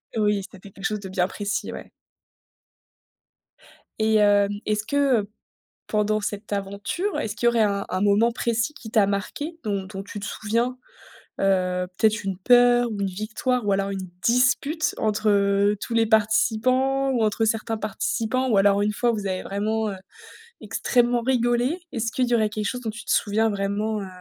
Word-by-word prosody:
Oui, 210 -2 +1
c'était 195 0 -14
quelque 195 - -14
chose 210 -1 -1
de 190 - -7
bien 185 -1 0
précis, 205 +1 -3
ouais - - -9 2.1
et 220 0 +2
hem, 205 -1 +4
est-ce 215 0 0
que, 280 - -3 0.3
heu, 200 - -10 0.6
pendant 215 0 +1
cette 205 0 -5
aventure, 200 - -3
est-ce 210 - -2
qu'il 240 - -1
y - - +8
aurait 235 -2 +3
un 200 -1 0
un 185 - -2
moment 205 +3 +4
précis 235 +4 -1
qui 225 -7 -10
t'a 210 -3 +4
marqué, 290 +12 -4
dont 200 -3 -2
dont 195 0 -7
tu 205 +1 -8
te 200 - -6
souviens? 230 +5 -1 0.6
Heu, 180 -2 +1
peut-être 220 0 +2
une 195 -2 -3
peur 245 +3 +4
ou 205 - -5
une 195 - +1
victoire 215 +5 -2
ou 200 - +1
alors 195 0 0
une 190 -2 -5 0.2
dispute 275 +6 +2
entre, 215 0 0
heu, 200 0 +3
tous - - -4
les 230 0 +3
participants 240 +5 +2
ou 240 -4 +1
entre 215 +1 +1
certains 225 0 -1
participants 225 +4 -1
ou 215 - +3
alors 200 +1 +4
une 210 +1 +1
fois, 240 +3 +1
vous 210 -3 -3
avez 185 -1 -3
vraiment, 215 +2 -1
heu, 195 - -5 0.7
extrêmement 240 -1 +1
rigolé? 245 +5 +1
Est-ce 230 -3 -2
qu'il 250 +1 0
y 245 - 0
aurait 215 -2 +2
quelque 215 0 -4
chose 250 +3 -4
dont 225 - -3
tu 235 - -10
te - - -2
souviens 220 +1 +2
vraiment, 205 +1 -2
heu, 195 - -6
215 Hz, 185 wpm, -24 LUFS, 200-235 Hz, 2.1 s, y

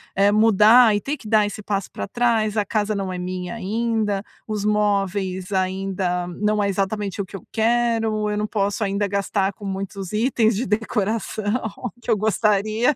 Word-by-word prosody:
eh, 200 +1 +4
mudar 220 +1 +6
e 205 - -1
ter 290 +2 -3
que 215 - -12
dar 215 -1 +4
esse 205 +1 -5
passo 200 -2 -3
pra - - -5
trás, 225 -2 +1
a 210 - +3
casa 210 0 -1
não 195 -1 -3
é 180 - -4
minha 180 +1 -4
ainda, 220 -1 -1 0.2
os 210 -2 -3
móveis 200 -2 0
ainda 185 -1 -1
não 210 0 +1
é 200 - +1
exatamente 200 +1 -2
o - - -4
que 190 - -11
eu 190 - -9
quero, 225 -2 +1
eu 210 - -2
não 210 - -1
posso 205 0 -1
ainda 200 +1 0
gastar 200 0 0
com 205 - -11
muitos 195 -1 -5
itens 225 0 +2
de 235 +6 -1
decoração 215 +1 -1 0.3
que - - -10
eu - - +5
gostaria. 215 +4 +2
210 Hz, 180 wpm, -22 LUFS, 195-220 Hz, 0.3 s, mudar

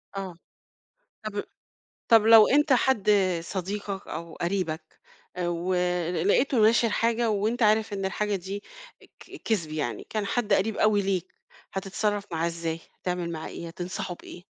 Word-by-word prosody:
آه، 190 -3 -5 0.9
طَب 205 -1 -3 0.7
طَب 225 -2 +7
لو 225 -1 +9
أنت 295 +1 +4
حد 240 -5 +3 0.3
صديقك 195 +2 -4
أو 165 0 -6
قريبك 170 -3 -3 0.4
آآ، 175 -1 -1
ول 180 0 0
لقيته 255 +4 +3
ناشر 230 +2 +5
حاجة 230 +1 +1
وأنت 220 +4 0
عارف 215 0 +3
إن 195 -1 -3
الحاجة 205 +2 -1
دي 195 +3 -6 0.6
ك - - -11
كِذب 170 -9 -1
يعني، 145 -7 -3
كان 215 -2 -2
حد 215 0 -1
قريب 205 +2 +2
أوي 210 -1 +3
ليك 190 -3 -2 0.4
هتتصرّف 200 +1 -1
معاه 165 +1 0
إزاي، 165 -1 -3 0.2
هتعمل 180 -1 -2
معاه 160 0 -5
إيه، 170 - -7
هتنصحه 180 +1 -5
بإيه؟ 175 +1 -12
195 Hz, 145 wpm, -27 LUFS, 175-215 Hz, 0.9 s, لو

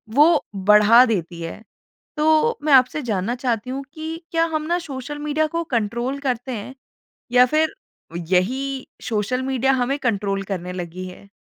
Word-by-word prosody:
वो 305 +4 +5
बढ़ा 210 +5 +6
देती 175 -7 -3
है। 165 +5 -6 0.6
तो 315 +10 +3
मैं 300 -1 +3
आपसे 260 +3 +5
जानना 220 0 -1
चाहती 245 -2 -2
हूँ 270 +2 -4
कि 320 0 -6
क्या 330 0 +2
हम 310 - 0
ना 345 +1 +1
सोशल 290 -2 -7
मीडिया 300 +1 0
को 335 +2 -2
कंट्रोल 235 +5 -1
करते 260 -2 -2
हैं? 240 +3 -6 0.6
या 250 0 +7
फ़िर 310 +4 +1 0.6
यही 260 +9 0 0.2
सोशल 230 +3 -1
मीडिया 265 0 +1
हमें 260 +2 0
कंट्रोल 200 -6 -1
करने 180 -2 -4
लगी 180 0 -6
है? 185 +2 -12
255 Hz, 160 wpm, -22 LUFS, 210-295 Hz, 0.6 s, या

